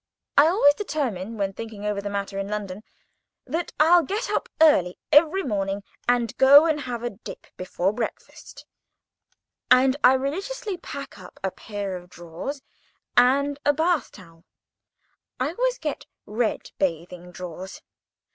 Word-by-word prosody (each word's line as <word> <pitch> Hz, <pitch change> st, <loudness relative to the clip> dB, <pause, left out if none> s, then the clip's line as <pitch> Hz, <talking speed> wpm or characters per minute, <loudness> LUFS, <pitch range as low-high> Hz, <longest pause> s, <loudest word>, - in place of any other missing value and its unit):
I 290 Hz, +2 st, +7 dB
always 325 Hz, -5 st, +5 dB
determine—when 230 Hz, -, -3 dB
thinking 215 Hz, 0 st, -8 dB
over 205 Hz, -1 st, -1 dB
the 205 Hz, -, -4 dB
matter 200 Hz, -1 st, -3 dB
in 195 Hz, -, -3 dB
London—that 210 Hz, -, -7 dB
I'll 340 Hz, +3 st, +6 dB
get 405 Hz, +7 st, -3 dB
up -, -, -1 dB
early 240 Hz, -, +4 dB
every 325 Hz, +6 st, +5 dB
morning, 200 Hz, -3 st, -2 dB, 0.3 s
and 240 Hz, -3 st, +1 dB
go 280 Hz, +3 st, +8 dB
and 310 Hz, -2 st, +1 dB
have 245 Hz, -3 st, -5 dB
a 240 Hz, -, -2 dB
dip 205 Hz, -, -11 dB
before 185 Hz, +1 st, -1 dB
breakfast, 230 Hz, 0 st, -7 dB, 1.0 s
and 260 Hz, +1 st, +5 dB
I 250 Hz, -, +8 dB
religiously 390 Hz, -, -3 dB
pack 280 Hz, -9 st, -8 dB
up 180 Hz, -, -13 dB
a 190 Hz, -, -1 dB
pair 205 Hz, -2 st, -5 dB
of 180 Hz, 0 st, -14 dB
drawers 175 Hz, -, -7 dB, 0.5 s
and 280 Hz, +3 st, +3 dB
a 290 Hz, -, +3 dB
bath 320 Hz, -2 st, 0 dB
towel. 165 Hz, -3 st, -16 dB, 1.0 s
I 255 Hz, +3 st, 0 dB
always -, -, 0 dB
get 300 Hz, -3 st, -5 dB, 0.2 s
red 220 Hz, +1 st, -2 dB
bathing 175 Hz, 0 st, -3 dB
drawers. 180 Hz, +1 st, -8 dB
240 Hz, 135 wpm, -24 LUFS, 195-295 Hz, 1.0 s, go